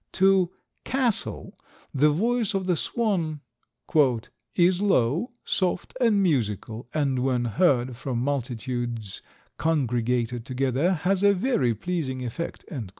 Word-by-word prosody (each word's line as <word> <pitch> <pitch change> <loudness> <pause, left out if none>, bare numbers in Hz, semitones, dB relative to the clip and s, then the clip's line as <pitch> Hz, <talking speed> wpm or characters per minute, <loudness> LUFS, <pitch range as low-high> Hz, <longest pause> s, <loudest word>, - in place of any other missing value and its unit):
To 190 -2 +4 0.3
Cassell 255 -5 -1 0.4
the 145 +2 +4
voice 225 +6 +1
of 190 -1 -1
the 180 -1 +2
swan 170 -8 -1 1.1
"is 180 +1 +3
low, 170 - +2
soft 185 -2 -1
and 215 -5 +4
musical, 115 - -1
and 140 -4 0
when 125 -1 +1
heard 130 - +2
from 130 0 -4
multitudes 120 -4 -3 0.4
congregated 125 -5 0
together 135 +6 0
has 185 +3 +1
a 200 0 +5
very 180 - +1
pleasing 130 - -3
effect." 145 +8 -5
145 Hz, 110 wpm, -26 LUFS, 125-185 Hz, 1.1 s, a